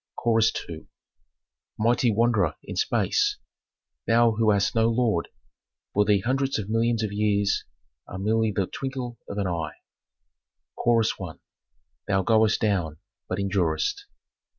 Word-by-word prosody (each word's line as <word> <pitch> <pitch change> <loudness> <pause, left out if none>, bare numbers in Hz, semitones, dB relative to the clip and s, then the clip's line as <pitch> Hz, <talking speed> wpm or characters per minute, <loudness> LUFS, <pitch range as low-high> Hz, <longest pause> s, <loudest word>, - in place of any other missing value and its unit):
Chorus 115 -1 +2 0.2
II. 80 -2 -9 0.9
"Mighty 120 +2 +2
wanderer 105 -7 +2
in - - -7
space, - - +1 0.7
thou 115 0 +4
who 110 0 +1
hast 100 -2 +2
no 115 0 +3
lord, 115 -7 0 0.6
for 105 +1 +3
thee 100 -1 +3
hundreds 135 +4 0
of 105 -2 -5
millions 115 0 +1
of 105 - -2
years 100 -1 +1 0.4
are 95 - -7
merely 110 +3 +1
the 95 -1 0
twinkle 130 0 -5
of 100 - -5
an 100 - 0
eye." 80 -4 -3 1.0
Chorus 115 -2 +2
I. 85 -4 -5 0.7
"Thou 95 -2 +1
goest 110 +1 +3
down, 90 -8 0 0.3
but 95 - -2
endurest. 100 - -1
110 Hz, 130 wpm, -25 LUFS, 95-115 Hz, 1.0 s, thou